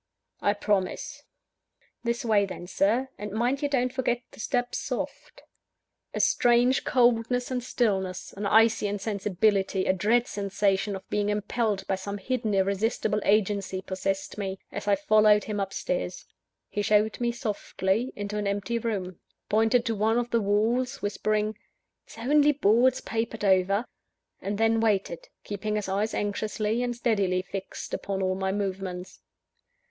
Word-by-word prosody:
"I 205 - +3
promise." 210 +9 -1 0.8
"This 235 0 -1
way 205 -3 +3
then, 180 -2 -7
Sir 220 +8 +1
and 210 0 -5
mind 245 +6 0
you 290 - 0
don't 255 -3 +1
forget 245 -2 0
to - - -15
step 245 +1 -1
soft." - - -5 0.7
A - - -1
strange 245 +2 +3
coldness 245 0 +2
and 250 -1 -1
stillness, 190 -7 -1
an 200 +1 -3
icy 220 0 +4
insensibility, 200 -1 0
a - - +3
dream 220 +6 +2
sensation 200 0 0
of 190 - -9
being 205 0 +1
impelled 210 0 -1
by - - -1
some 200 +2 -4
hidden, 220 0 -1
irresistible 210 +2 +1
agency, 200 -2 +1
possessed 195 +2 -3
me, 195 -1 -3
as 205 +1 -6
I 200 - +5
followed 210 +1 +4
him 210 -1 -3
upstairs. - - -3 0.4
He 205 - -2
showed 210 +1 +2
me 240 -1 +1
softly 215 0 -1
into 205 +1 -3
an 205 - -1
empty 205 +4 -1
room; 195 -6 -3 0.3
pointed 225 +3 +3
to 230 - 0
one 220 +2 +1
of 240 0 -1
the 230 - +2
walls, 225 +6 +1
whispering, 215 +1 -1 0.5
"It's - - -14
only 295 +5 +4
boards 250 0 +3
papered 225 -1 -3
over 195 +3 +3 0.3
" - - -48
and 200 +1 -3
then 225 +1 +3
waited, 200 -6 0 0.2
keeping 210 +1 -3
his 210 -2 -2
eyes 205 +3 -1
anxiously 210 +2 -1
and 245 -1 -1
steadily 200 -6 +1
fixed 190 +1 -7
upon 195 -1 -2
all 185 0 +1
my 190 0 -1
movements. 190 -2 -4
210 Hz, 150 wpm, -27 LUFS, 195-235 Hz, 0.8 s, I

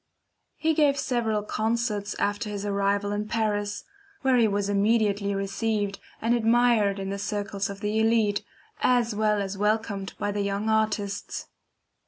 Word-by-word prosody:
He 320 0 +1
gave 290 -2 +3
several 225 -6 0
concerts 215 -1 -1
after 205 +2 -1
his 205 -1 -4
arrival 200 0 0
in 205 +1 -2
Paris, 205 -2 -1 0.4
where 265 -1 +4
he 230 -2 +5
was 200 -1 0
immediately 205 -1 +2
received 200 +1 -1 0.2
and 230 +2 +1
admired 230 -3 +3
in 195 0 -4
the 200 - -3
circles 200 0 -2
of 200 0 -7
the 210 +1 0
elite, 220 -2 +2 0.4
as 245 -3 +2
well 210 0 +2
as 195 0 -3
welcomed 210 -2 0
by 205 - -1
the 205 0 -1
young 200 +2 -1
artists. 215 -2 -1
210 Hz, 150 wpm, -26 LUFS, 200-225 Hz, 0.4 s, he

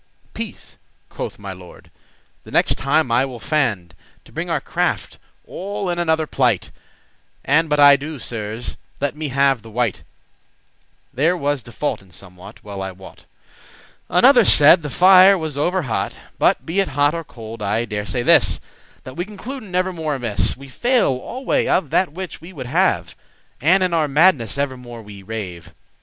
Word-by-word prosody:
"Peace," - - -8 0.3
quoth - - -6
my 100 -2 -7
lord; 90 -1 -15 0.5
"the - - -14
next - - +3
time 140 -1 +1
I 120 +3 +3
will 130 -3 -5
fand* 115 - -1
*endeavour 80 - -29
To - - -18
bring - - -4
our - - +1
craft - - -2 0.3
*all 200 0 -4
in 175 - -3
another 160 -2 +1
plight,* 125 -9 +1
*to - - -9
a - - -23
different - - -31
conclusion* 150 +4 -3
And 165 - -10
but 150 0 +1
I 145 -1 +9
do, 150 +2 -6
Sirs, 110 -1 -5 0.2
let 145 0 -1
me 155 0 -4
have 135 -2 +2
the 115 - -13
wite;* 115 -1 -1
*blame - - -23 1.1
There 160 +8 +2
was 145 -3 -1
default 120 +4 -4
in 95 - -20
somewhat, 90 0 -12
well 100 -2 -7
I 95 - -3
wot." 95 +1 -14 0.8
Another 245 +6 +6
said, 165 -1 +6
the 150 - -5
fire 185 +4 +7
was 160 -4 -4
over 175 +5 0
hot. 120 -5 -3 0.2
But - - +2
be 170 +5 -1
it 195 - +2
hot 145 +2 +3
or 165 0 -4
cold, 115 -6 -10
I 105 +3 0
dare 105 -2 -4
say 125 -2 -2
this, - - +4 0.4
That 130 - -9
we 175 - -2
concluden 210 0 -8
evermore 175 -5 -1
amiss; 115 -6 -1
We 140 +1 -12
fail 240 - +1
alway 245 - -2
of 160 -7 +1
that 185 -5 +2
which 185 0 -7
we 170 +3 -11
would 130 -6 -7
have; 120 - 0 0.5
And 185 +7 +4
in 180 -2 0
our 160 -2 +2
madness 145 -4 +3
evermore 125 -4 -4
we 100 -1 -11
rave. 95 -5 -7
140 Hz, 185 wpm, -20 LUFS, 115-175 Hz, 1.1 s, I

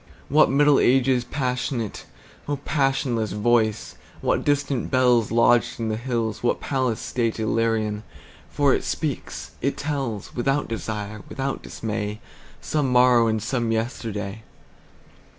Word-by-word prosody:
What 155 +3 +5
Middle 145 +1 +4
Ages 130 -1 +3
passionate,O 125 +1 -4
passionless 135 -6 0
voice! 110 0 +1 0.3
What - - +1
distant 145 -3 0
bellsLodged 120 -2 +3
in 115 -1 -1
the 110 - 0
hills, 115 -2 -2
what 120 - +1
palace 130 -5 -1
stateIllyrian! 110 -2 0 0.5
For - - +3
it - - 0
speaks, - - -4
it 140 - -1
tells, 135 -8 -3
Without 135 +4 0
desire, 105 -2 -4
without 135 0 -3
dismay, 105 -1 -4 0.4
Some 145 -4 0
morrow 125 -2 +5
and 110 -1 0
some 120 -1 -1
yesterday. 110 -3 -3
120 Hz, 115 wpm, -24 LUFS, 110-135 Hz, 0.5 s, What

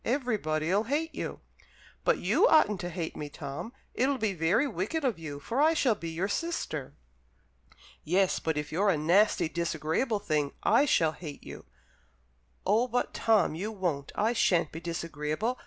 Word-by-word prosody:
Everybody'll 205 - 0
hate 310 +6 -1
you." - - -5 0.6
"But - - +3
you - - +3
oughtn't 210 - +4
to 175 - -4
hate 170 -2 -4
me, 150 - -5
Tom. 145 +10 -6 0.2
It'll 270 +2 +1
be 215 -4 0
very 175 - +2
wicked 255 - -2
of 235 -10 0
you, 145 -3 -6
for 235 - -1
I 320 +2 +4
shall 255 -7 +3
be 170 -5 -6
your 170 +4 -2
sister." 200 - -3 1.1
"Yes, 185 +3 +2
but 160 -2 -1
if 150 0 -3
you're 200 +6 +2
a 180 - +3
nasty, 175 +3 +3
disagreeable 170 - -1
thing, 150 -8 -1
I 235 +7 +4
shall 165 - +3
hate 150 -2 -9
you." - - -10 1.0
"Oh 220 +6 +3
but, 245 0 -1
Tom, 220 -8 +3
you 195 +7 -4
won't! 175 -9 -2
I 220 +3 +1
shan't 175 -8 +2
be 165 - -6
disagreeable. 165 - -3
185 Hz, 165 wpm, -29 LUFS, 160-230 Hz, 1.1 s, oughtn't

